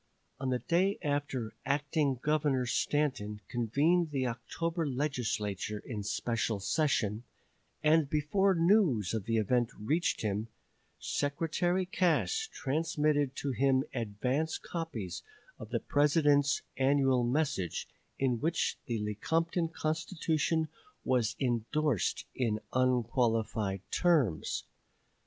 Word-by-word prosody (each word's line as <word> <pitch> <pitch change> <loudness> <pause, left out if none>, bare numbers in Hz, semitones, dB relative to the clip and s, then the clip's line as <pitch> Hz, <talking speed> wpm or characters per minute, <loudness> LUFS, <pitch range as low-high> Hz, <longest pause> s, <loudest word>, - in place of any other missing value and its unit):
On 135 -1 -2
the 125 - +2
day 185 +9 +1
after 145 -6 -2
Acting 145 0 +1
Governor 145 -4 +2
Stanton 120 -5 0
convened 145 +9 +2
the 135 -3 -1
October 165 +8 -2
Legislature 115 -7 -2
in 110 -4 -4
special 110 +1 -1
session, 110 -2 0 0.6
and 155 -1 +4
before 185 +7 +2
news 165 - +3
of 110 -4 -2
the 115 0 +1
event 120 +2 +2
reached 155 +12 0
him, 105 0 -1 0.5
Secretary 170 +5 0
Cass 190 - +1
transmitted 150 -1 0
to 140 - -2
him 130 +2 +2
advance 125 +7 -1
copies 160 - -5 0.4
of - - -8
the - - 0
President's 145 -1 +3
annual 135 -2 +3
message, 125 - -1 0.3
in 125 -3 +1
which 165 +5 0
the 115 - -1
Lecompton 165 - 0
Constitution 160 0 -1 0.4
was 120 -4 +1
indorsed 125 - 0
in 115 -4 0
unqualified 115 -5 +1
terms. 150 - +2
140 Hz, 105 wpm, -31 LUFS, 115-155 Hz, 0.6 s, and